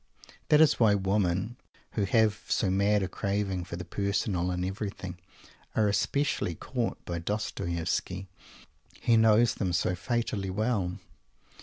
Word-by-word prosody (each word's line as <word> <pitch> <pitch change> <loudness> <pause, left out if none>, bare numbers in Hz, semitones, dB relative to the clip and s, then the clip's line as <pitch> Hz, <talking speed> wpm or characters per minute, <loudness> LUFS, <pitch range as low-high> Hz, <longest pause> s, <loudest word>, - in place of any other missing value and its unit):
That 150 0 +6
is 155 - +5
why 110 -3 +5
women 95 +2 0 0.3
who 105 - 0
have 110 +1 +2
so 95 - +1
mad 100 +1 +3
a - - 0
craving 100 -2 -2
for 85 - -6
the 90 0 -6
personal 100 -1 -1
in 90 0 -1
everything 95 -2 -5 0.6
are 110 -1 +3
especially 105 - 0
caught 120 - -3
by 85 -1 -3
Dostoievsky. 95 -1 -2 0.7
He 115 - +3
knows 110 +1 +5
them 95 -4 -2
so 90 +1 +1
fatally 100 +1 -2
well. 100 -3 -1
100 Hz, 135 wpm, -29 LUFS, 90-110 Hz, 0.7 s, That